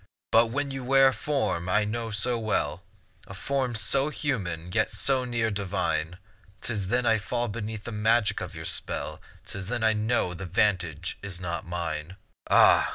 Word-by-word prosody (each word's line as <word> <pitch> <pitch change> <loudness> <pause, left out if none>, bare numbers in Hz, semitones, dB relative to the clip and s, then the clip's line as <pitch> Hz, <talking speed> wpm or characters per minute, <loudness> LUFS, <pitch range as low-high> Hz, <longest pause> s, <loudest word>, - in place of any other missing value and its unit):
But 115 +1 +6
when 140 +4 -2
you 135 -1 -5
wear 135 +1 +6
a - - -2
form 110 - -1
I 105 +3 +3
know 115 +2 -3
so 115 +3 0
well, 95 -7 -1 0.5
A 95 - -9
form 130 +3 -1
so 135 +6 +2
human, 90 - -3
yet 110 +3 +1
so 130 -2 +1
near 120 -2 0
divine; 90 -4 -1 0.4
'Tis 105 -5 -3
then 125 +4 +1
I 115 -1 +4
fall 120 +3 -2
beneath 110 0 -5
the 120 - -6
magic 110 +1 +2
of - - -6
your - - -7
spell, - - -3 0.2
'Tis 95 -1 -6
then 120 +1 -2
I 110 0 +5
know 110 -3 0
the 90 +1 -6
vantage 90 -3 0
is 95 -3 -6
not 85 -2 -4
mine. 85 0 -4 0.3
Ah! - - +6
110 Hz, 175 wpm, -27 LUFS, 90-120 Hz, 0.5 s, But